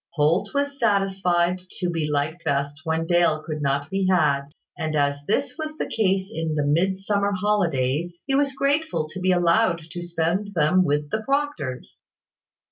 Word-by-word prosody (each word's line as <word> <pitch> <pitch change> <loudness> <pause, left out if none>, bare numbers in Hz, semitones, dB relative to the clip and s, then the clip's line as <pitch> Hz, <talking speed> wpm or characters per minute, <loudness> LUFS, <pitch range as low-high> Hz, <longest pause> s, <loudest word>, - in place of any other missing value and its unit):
Holt 170 +7 +2
was 285 0 -1
satisfied 190 -4 +1 0.2
to 180 - -1
be 160 -3 -1
liked 150 +4 -1
best 140 +1 -1
when 160 0 0
Dale 170 -3 +2
could 155 -2 -4
not 140 +1 -1
be 195 -1 0
had; 150 -7 +2 0.3
and 155 -1 -3
as 140 -1 +1
this 275 +7 0
was 310 0 -5
the - - -1
case 195 -2 0
in 160 -1 -2
the 145 -1 0
Midsummer 195 +6 +1
holidays, 175 -5 0
he 270 - -1
was 275 0 +2
grateful 280 - 0
to 180 +4 -7
be 185 0 +2
allowed 175 0 +2
to 175 0 -5
spend 175 +4 -2
them 165 +4 +4
with 150 -1 -1
the 220 - -1
Proctors. 275 - -3
175 Hz, 165 wpm, -24 LUFS, 155-200 Hz, 0.3 s, them